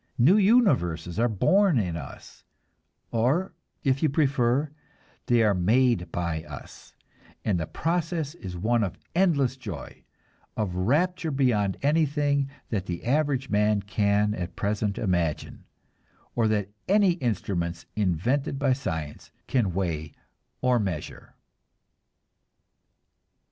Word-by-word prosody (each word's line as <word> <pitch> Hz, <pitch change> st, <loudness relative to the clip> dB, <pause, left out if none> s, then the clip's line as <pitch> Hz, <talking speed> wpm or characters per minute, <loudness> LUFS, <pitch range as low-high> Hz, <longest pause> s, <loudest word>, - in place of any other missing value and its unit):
New 140 Hz, +11 st, +6 dB
universes 130 Hz, -, +2 dB
are 120 Hz, +1 st, +3 dB
born 185 Hz, -, +3 dB
in 90 Hz, -7 st, 0 dB
us, 80 Hz, -, -10 dB, 0.7 s
or, 135 Hz, +12 st, +1 dB, 0.3 s
if 135 Hz, -1 st, +1 dB
you 155 Hz, -, +3 dB
prefer, 140 Hz, -1 st, +1 dB, 0.6 s
they 120 Hz, -3 st, +4 dB
are 105 Hz, -2 st, +4 dB
made 110 Hz, +2 st, +2 dB
by 85 Hz, -2 st, -2 dB
us; -, -, -11 dB, 0.5 s
and 100 Hz, -5 st, +1 dB
the 80 Hz, -, -3 dB
process 165 Hz, -2 st, -2 dB
is 95 Hz, -, -8 dB
one 115 Hz, +5 st, +1 dB
of 95 Hz, -, -3 dB, 0.2 s
endless 150 Hz, -9 st, +2 dB
joy, 105 Hz, -, -8 dB, 0.5 s
of 105 Hz, -5 st, -1 dB
rapture 160 Hz, -, +1 dB
beyond 120 Hz, -9 st, +1 dB
anything 145 Hz, -2 st, +2 dB, 0.2 s
that 100 Hz, -4 st, -2 dB
the 85 Hz, -1 st, -5 dB
average 135 Hz, 0 st, 0 dB
man 105 Hz, 0 st, +3 dB
can 100 Hz, +1 st, +1 dB
at 90 Hz, -3 st, -5 dB
present 105 Hz, 0 st, -1 dB
imagine, 85 Hz, -6 st, -1 dB, 0.7 s
or 115 Hz, -2 st, +2 dB
that 105 Hz, -2 st, 0 dB, 0.2 s
any 200 Hz, -1 st, +4 dB
instruments 95 Hz, -, -2 dB
invented 110 Hz, -, 0 dB
by 135 Hz, -2 st, +2 dB
science 80 Hz, -, -5 dB, 0.2 s
can 115 Hz, -8 st, +1 dB
weigh 80 Hz, -5 st, -3 dB, 0.5 s
or 125 Hz, -1 st, +3 dB
measure. 95 Hz, -8 st, -5 dB
115 Hz, 115 wpm, -26 LUFS, 95-140 Hz, 0.7 s, New